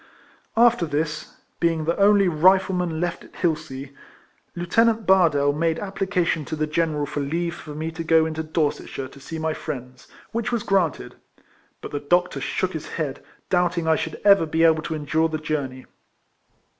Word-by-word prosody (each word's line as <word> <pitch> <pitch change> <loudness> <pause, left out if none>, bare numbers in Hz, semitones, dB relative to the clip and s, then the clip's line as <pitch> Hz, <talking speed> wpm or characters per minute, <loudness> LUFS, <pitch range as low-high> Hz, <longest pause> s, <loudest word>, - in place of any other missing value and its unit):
After 235 -6 +4
this, 150 +1 -3 0.2
being 165 -2 +1
the 170 +2 +1
only 200 -1 +5
Rifleman 180 0 +3
left 175 0 -2
at - - -17
llilsea, 140 -5 -3 0.6
Lieutenant 220 +6 +2
Bardell 155 -7 +4
made 160 +2 0
application 190 -5 -1
to 155 - -4
the 155 0 0
General 155 -1 0
for 145 - -4
leave 170 +4 -2
for 150 -3 -9
me 160 +2 -3
to 165 +1 -5
go 160 0 +4
into 160 0 -3
Dorsetshire 155 -4 -2
to 140 - -15
see 160 +4 -7
my 160 0 -1
friends, 125 -3 -7 0.2
which 230 +1 -2
was 235 -3 -1
granted; 190 -5 0 0.6
but - - -7
the 145 - -2
doctor 175 +5 +1
shook 185 0 -1
his 160 -2 -5
head, 145 -4 -3 0.3
doubting 175 -2 +1
I 160 - +4
should - - -4
ever 200 -5 +6
be 160 +2 +1
able 160 -1 +5
to 160 +1 -4
endure 155 +2 0
the 155 - -2
journey. 145 -4 -4
160 Hz, 170 wpm, -23 LUFS, 150-180 Hz, 0.6 s, ever